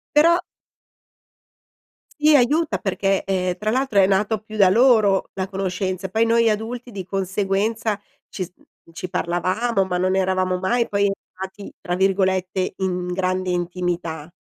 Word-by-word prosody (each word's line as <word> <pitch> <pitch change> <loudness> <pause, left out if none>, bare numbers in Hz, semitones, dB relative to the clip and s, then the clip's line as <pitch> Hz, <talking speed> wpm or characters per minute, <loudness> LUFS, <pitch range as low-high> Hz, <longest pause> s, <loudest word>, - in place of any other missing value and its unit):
Però 335 +3 +6 1.8
Sì, 305 +1 +5
aiuta 285 - +3
perché, 195 +1 0
ehm, 185 -2 -1
tra 215 +2 -1
l'altro 260 -3 +2
è 190 - +6
nato 205 +2 +1
più 215 0 -9
da 195 -3 +6
loro 220 -3 +4
la 190 -1 -2
conoscenza, 190 -1 -3
poi 220 +4 +2
noi 230 0 +3
adulti 230 +3 -4
di 195 -4 -6
conseguenza 195 +3 -1 0.3
ci 190 - -5
s 180 - -6
mhmm, 165 - -25
ci 180 +2 -6
parlavamo 185 +5 0
ma 180 -1 -2
non 185 +1 +1
eravamo 185 -1 +1
mai 235 +6 0
poi 200 0 +1
entrati, 190 0 -7
tra 175 - -3
virgolette, 190 0 +1
"in 180 -2 -2
grande 185 0 -1
intimità." 175 -3 -3
190 Hz, 145 wpm, -22 LUFS, 185-215 Hz, 1.8 s, Però